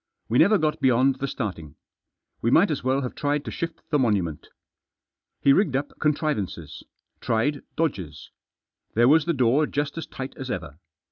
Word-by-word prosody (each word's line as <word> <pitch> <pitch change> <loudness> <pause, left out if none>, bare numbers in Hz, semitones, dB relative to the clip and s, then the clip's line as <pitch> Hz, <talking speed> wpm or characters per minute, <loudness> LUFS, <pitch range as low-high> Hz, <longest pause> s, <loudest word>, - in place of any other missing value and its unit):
We 120 - +3
never 205 +6 +6
got 155 -3 -1
beyond 130 +1 +3
the 140 - -2
starting. 90 - -5 0.7
We 115 - +1
might 165 +8 +4
as 145 - -3
well 130 +2 +1
have 125 - -4
tried 145 0 -1
to - - -5
shift 165 0 -5
the 150 - +3
monument. 100 - 0 0.9
He 140 - +5
rigged 150 -6 +2
up 145 +2 -2
contrivances; 115 - -2 0.4
tried 135 +6 0
dodges. 90 - -3 0.6
There 120 +2 +5
was 155 +3 +5
the 170 - +1
door 135 +3 +2
just 145 +2 -2
as - - -6
tight 130 0 -7
as 130 -1 -6
ever. 75 - -5
135 Hz, 165 wpm, -25 LUFS, 115-150 Hz, 0.9 s, never